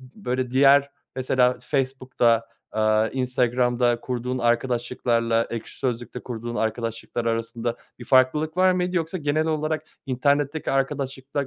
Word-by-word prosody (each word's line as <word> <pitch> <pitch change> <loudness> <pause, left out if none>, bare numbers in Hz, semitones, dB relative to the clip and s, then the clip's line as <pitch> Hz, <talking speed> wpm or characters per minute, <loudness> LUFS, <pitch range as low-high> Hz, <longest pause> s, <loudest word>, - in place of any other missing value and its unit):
böyle, 130 - -4
diğer 140 +2 +5 0.3
mesela 125 -1 +2
Facebook'ta, 130 -4 +1 0.3
aaa, 110 0 +2
Instagram'da 125 -1 +1
kurduğun 125 +1 -3
arkadaşlıklarla 120 -1 +1
Ekşi 115 -2 -7
Sözlük'te 125 -1 -3
kurduğun 120 -1 -6
arkadaşlıklar 115 +1 -2
arasında 115 +1 -2 0.2
bir 120 - -9
farklılık 150 +6 +3
var 185 0 +5
mıydı? 180 0 -1
Yoksa 165 +2 -1
genel 155 +1 0
olarak 155 0 -1 0.2
internetteki 140 +4 0
arkadaşıkla 135 0 -2
125 Hz, 115 wpm, -24 LUFS, 120-140 Hz, 0.3 s, diğer